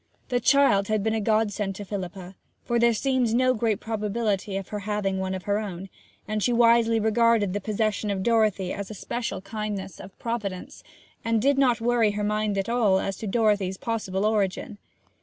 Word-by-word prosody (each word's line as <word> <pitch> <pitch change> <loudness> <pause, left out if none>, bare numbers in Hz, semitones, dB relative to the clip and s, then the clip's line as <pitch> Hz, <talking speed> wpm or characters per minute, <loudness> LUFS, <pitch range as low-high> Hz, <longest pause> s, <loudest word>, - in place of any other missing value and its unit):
The 245 - +1
child 245 -7 +4
had 215 -2 0
been 220 0 0
a 220 - 0
godsend 210 -2 0
to 205 - -7
Philippa, 190 -1 -6 0.3
for 240 -1 +1
there 235 0 +5
seemed 245 -1 +1
no 255 +1 +3
great 220 -3 0
probability 210 -2 -2
of 195 - -6
her 210 - -4
having 200 -2 -2
one 190 0 -2
of 185 - -6
her 205 +2 0
own: 195 -3 -6 0.4
and 215 0 -2
she 245 - +2
wisely 230 -1 +4
regarded 220 -2 +2
the 205 - -2
possession 215 0 -1
of 195 -2 -1
Dorothy 215 -5 +2
as 200 -1 -5
a 215 - -7
special 235 +1 -4
kindness 205 -2 -5
of 195 0 -11
Providence, 210 -6 -5 0.4
and 230 -1 +1
did 275 +4 +2
not 245 -4 +3
worry 230 -3 +2
her 210 0 -2
mind 210 -1 0
at 195 - -1
all 225 -5 +3
as 195 0 -2
to 220 - -5
Dorothy's 205 -3 +1
possible 210 -4 -2
origin. 205 -1 -1
215 Hz, 190 wpm, -25 LUFS, 195-230 Hz, 0.4 s, there